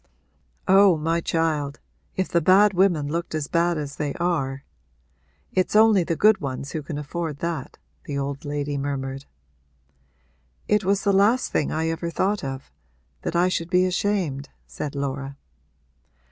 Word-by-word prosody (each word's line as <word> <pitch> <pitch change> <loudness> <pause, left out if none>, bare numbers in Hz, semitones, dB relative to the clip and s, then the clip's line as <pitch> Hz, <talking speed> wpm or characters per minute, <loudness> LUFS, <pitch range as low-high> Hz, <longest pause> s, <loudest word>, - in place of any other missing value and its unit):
'Oh 195 -2 +6
my 165 +2 0
child, 155 -4 -1 0.4
if 190 - 0
the 170 - +1
bad 195 +5 +5
women 175 -6 +2
looked 165 +2 -3
as 155 -2 -2
bad 170 -1 +1
as 145 -2 -5
they 145 -2 -2
are! 140 -6 -1 0.9
It's 185 +2 0
only 215 -3 +6
the 165 - -1
good 215 +3 +4
ones 135 0 -4
who 155 - -3
can 145 +1 -6
afford 150 +1 -4
that,' 165 -4 -4 0.3
the 145 - -4
old 140 0 -3
lady 145 -1 -3
murmured. 135 -1 -4 1.4
'It 210 -1 +2
was 195 +1 +1
the 200 -1 +2
last 215 +6 +3
thing 150 - 0
I 160 +1 0
ever 165 +1 -3
thought 195 +3 0
of 135 - -6 0.5
that - - -3
I 175 +1 +4
should 170 -2 -2
be 180 0 +3
ashamed,' 180 -7 -1 0.2
said 145 -1 -6
Laura. 140 0 -4
165 Hz, 155 wpm, -24 LUFS, 140-185 Hz, 1.4 s, Oh